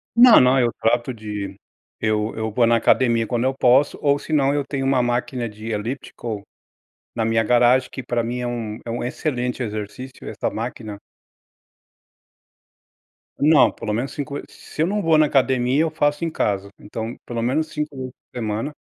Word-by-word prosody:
Não, 240 0 +9
não, 130 +1 +4
eu 120 -1 +2
trato 120 +2 +1
de 105 -3 -6 0.4
eu 110 0 0
eu 110 0 -2
vou 120 +2 +3
na 115 0 +4
academia 115 -1 +3
quando 120 +1 -1
eu 130 +1 +1
posso, 130 +4 +4
ou 140 -1 +3
se - - -12
não, 140 -3 +3
eu 145 0 +1
tenho 135 0 -3
uma 135 -2 +2
máquina 120 0 -1
de 110 +2 -9
elíptico, 110 -1 -5 0.7
na 115 - 0
minha 115 0 +2
garagem, 125 +2 +4
que 130 - -7
pra 120 -1 -1
mim 120 +2 -3
é 125 - -2
um 115 -3 -4
é - - -6
um 120 - -3
excelente 125 -2 -2
exercício, 110 +4 -6
essa - - -2
máquina. 110 -2 -5 2.4
Não, 150 +1 +5
pelo 105 - -4
menos 120 +5 -2
5 145 -1 -5
ve 145 - -4
Se 155 - -6
eu 165 - +3
não 205 +2 -1
vou 165 -2 +4
na 155 - +5
academia, 130 -1 +2
eu 165 - 0
faço 145 +1 0
em 165 - -1
casa, 100 -8 -1
então, 110 +3 -6
pelo 115 -1 -3
menos 145 +7 0
5 150 -2 -4
vezes 130 -1 -5
por - - -24
semana. 110 +5 -2
125 Hz, 185 wpm, -22 LUFS, 115-140 Hz, 2.4 s, Não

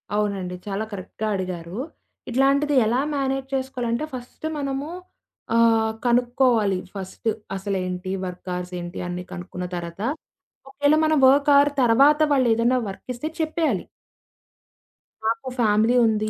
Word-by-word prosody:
అవునండి. 200 -4 -1
చాలా 200 +1 -2
కరెక్ట్‌గా 205 +2 -5
అడిగారు. 180 0 -4 0.5
ఇట్లాంటిది 275 +3 +2
ఎలా 240 +4 +2
మేనేజ్ 270 -1 -1
చేసుకోవాలంటే 260 0 -2
ఫస్టు 250 +5 -7
మనము 275 +1 -3 0.7
ఆహ్, 225 -1 +4
కనుక్కోవాలి 240 -4 +3 0.2
ఫస్టు. 195 +4 -4 0.3
అసలేంటి? 185 -1 -3
వర్క్ 180 0 -7
అవర్స్ 180 0 -5
ఏంటి? 175 +1 -6
అన్ని 180 0 -4
కనుక్కున్న 180 +1 -6
తర్వాత 170 +2 -6 0.7
ఒకేళ 285 +2 +3
మనం 310 0 +3
వర్క్ 280 +2 +4
అవర్ 285 +1 +5
తర్వాత 275 +6 +5
వాళ్ళు 265 -3 +4
ఏదైనా 235 +3 +2
వర్క్ 195 - -10
ఇస్తే 245 +5 -4
చెప్పేయాలి. 315 - 0 1.4
నాకు 245 +4 -1
ఫ్యామిలీ 220 +1 +3
ఉంది, 215 -1 0
230 Hz, 120 wpm, -23 LUFS, 190-270 Hz, 1.4 s, అవర్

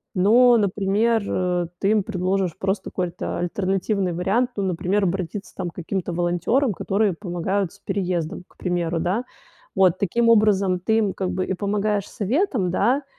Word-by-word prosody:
но, 235 +6 +6
например, 210 +3 +1
э, 180 -2 0
ты 200 - +2
им 215 -1 +3
предложишь 185 -1 -1
просто 190 +1 -2
какой-то 180 -2 -3
альтернативный 190 +2 -1
вариант. 195 +9 +1
Ну, 200 - -2
например, 190 +2 0
обратиться, 190 +1 -3
там, 180 -2 -3
к 165 - -17
каким-то 180 0 -3
волонтерам, 175 - +1
которые 200 +3 0
помогают 180 +1 -2
с 200 - -19
переездом, 180 -3 -2
к - - -28
примеру, 175 -2 -1
да. 185 +8 0 0.5
Вот 185 -2 +4
таким 230 +5 +2
образом 200 -4 +4
ты 220 +5 +1
им 205 -4 +1
как 185 -2 -2
бы 185 0 -1
и - - -2
помогаешь 205 +1 -1
советом, 220 - 0
да, 250 +10 +2
190 Hz, 160 wpm, -23 LUFS, 180-210 Hz, 0.5 s, но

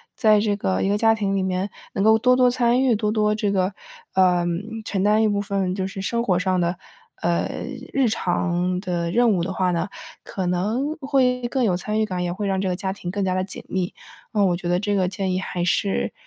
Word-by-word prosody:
在 215 -3 +4
这 205 -1 +1
个 95 - -1
一 - - +1
个 205 +1 +1
家 225 0 +4
庭 200 -2 -1
里 195 - +1
面 190 +1 -1 0.2
能 195 - 0
够 220 +1 +5
多 250 +2 +4
多 250 -1 +4
参 245 0 +2
与， 250 -4 +3
多 210 0 0
多 210 -1 +2
这 210 -1 0
个， 190 0 0 0.4
呃， 180 -2 +3 0.4
承 195 -3 -1
担 210 +2 +4
一 - - +4
部 205 -1 0
分 195 -2 -1
就 190 0 -2
是 195 - -7
生 235 +4 -1
活 185 -6 +2
上 185 0 +1
的， 175 +1 0 0.4
呃， 170 0 0 0.4
日 270 -2 +2
常 180 -3 0
的 175 -3 -2
任 235 +5 +3
务 180 -4 +1
的 190 - -3
话 185 -1 0
呢， 175 +3 -1 0.3
可 190 - -4
能 215 - -1
会 255 -3 +1
更 260 +1 0
有 195 -6 +2
参 210 +4 -2
与 220 - +2
感， 180 -4 -3
也 175 - -1
会 200 +4 -3
让 190 -1 0
这 195 - -1
个 180 - 0
家 190 0 -3
庭 180 -3 -7
更 200 +1 -1
加 185 - 0
地 185 0 0
紧 190 - -8
密。 185 -1 -2 0.4
嗯， 205 -2 +3
我 175 - +1
觉 175 0 -4
得 175 0 +2
这 205 +1 -1
个 185 -2 +2
建 190 0 -2
议 185 - 0
还 180 -2 -3
是 195 +2 0
195 Hz, 260 characters per minute, -23 LUFS, 180-215 Hz, 0.4 s, 够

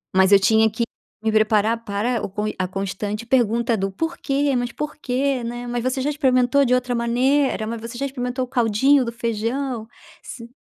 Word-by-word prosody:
mas 190 +1 +5
eu 200 - +8
tinha 220 +2 +4
que 225 +3 -2 0.4
me 220 - +1
preparar 215 +1 +2
para 220 +3 -1
o - - -8 0.3
a 185 -1 -1
constante 200 +3 -4
pergunta 235 -1 +2
do: 195 0 -2
"Porquê? 285 - -1
Mas 245 -1 -1
por 300 0 -5
que? 265 -1 -1
Né, 240 +1 -5
mas 240 0 -2
você 255 +1 -1
já 285 - 0
experimentou 270 -2 +3
de 250 - +2
outra 250 0 0
maneira? 245 0 +1
Mas 230 0 -4
você 230 +1 -7
já 275 - -2
experimentou 255 -1 -3
o - - -19
caldinho 250 +3 +3
do 235 - -3
feijão, 235 +1 -3 0.4
você" 235 -2 -9
240 Hz, 185 wpm, -22 LUFS, 220-260 Hz, 0.4 s, eu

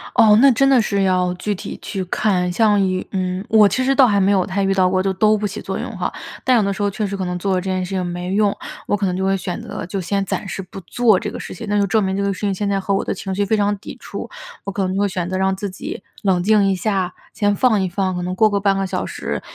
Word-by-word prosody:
哦， 215 -3 +6
那 275 0 +7
真 275 +3 +3
的 265 -3 +5
是 200 -2 0
要 180 -1 +2
具 205 +3 -2
体 190 - -7
去 195 -2 -4
看， 180 -1 0
像 205 +1 +3
有 185 0 -1
嗯， 185 0 -2
我 215 -2 +6
其 225 +7 0
实 270 +1 +3
倒 270 -2 +6
还 205 -3 +2
没 195 +1 +3
有 190 -2 +2
太 195 0 -1
遇 195 0 +2
到 185 -1 +3
过， 185 0 +1
就 195 - +1
都 215 +3 +3
不 210 - -3
起 200 - -6
作 - - -4
用 - - -5
哈。 - - -2 0.3
但 255 -1 +4
有 220 - +3
的 200 0 0
时 205 - -6
候 205 - +2
确 210 +2 -3
实 200 0 -3
可 190 -1 -3
能 180 0 -3
做 195 +2 -1
了 185 - +1
这 190 - -4
件 185 0 -1
事 - - -9
情 185 -1 -1
没 175 +1 -4
用， 205 0 +2 0.3
我 - - +2
可 200 - -1
能 180 -1 0
就 190 - -2
会 195 0 +2
选 180 -1 -4
择， - - -6
就 195 +3 -4
先 195 +3 -1
暂 195 - -3
时 190 - -4
不 190 +1 -10
做 215 +2 +2
这 210 - -4
个 - - -7
事 - - -7
情， 225 - -8
那 205 0 +2
就 200 - +3
证 215 +2 +2
明 190 0 -1
这 200 - -1
个 200 0 0
事 185 - -10
情 205 -2 0
现 205 +2 -2
在 200 -1 +1
和 195 +1 -1
我 - - 0
的 - - -1
情 195 - -5
绪 205 +1 +1
非 220 - +1
常 205 0 +1
抵 195 - -9
触。 - - -7 0.3
我 200 - -4
可 195 0 -2
能 185 - -2
就 195 - -1
会 205 - +3
选 180 -2 -3
择 185 - -2
让 190 0 +1
自 200 +1 -4
己 190 +1 -7 0.2
冷 190 -3 +2
静 210 0 +4
一 195 - +2
下， 185 -1 -1 0.2
先 205 0 +1
放 220 -3 +3
一 190 - 0
放， 185 0 -1
可 180 - -3
能 180 +1 -2
过 215 +3 +4
个 200 -1 0
半 195 -1 +2
个 195 - 0
小 - - -2
时， - - -4
195 Hz, 340 characters per minute, -20 LUFS, 185-210 Hz, 0.3 s, 那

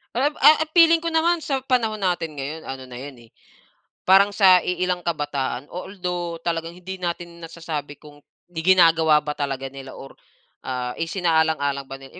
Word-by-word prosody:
Ah, 260 +4 +2 0.3
eh, 315 - -1
feeling 335 -1 +6
ko 335 - -5
naman 335 +1 +2
sa 275 -4 -3
panahon 225 -6 0
natin 175 -4 -1
ngayon 145 +3 -6
ano 135 0 -6
na 125 -1 -10
'yon, 140 +1 -9
eh, 120 -2 -18 0.8
parang 195 +2 +6
sa 190 -3 +5
iilang 180 0 -2
kabataan 145 -5 -3
although 180 -2 -5
talagang 165 0 -3
hindi 185 +1 -8
natin 170 -1 -5
nasasabi 160 -3 -6
kung 145 -1 -16 0.3
ginagawa 165 -3 +4
ba 150 - -2
talaga 135 -2 -4
nila 135 -1 -10
or, 135 - -11 0.5
ah, 125 -1 -4
isinaalang-alang 160 -5 0
ba 135 - -7
nila. 135 0 -15
165 Hz, 155 wpm, -22 LUFS, 145-185 Hz, 0.8 s, feeling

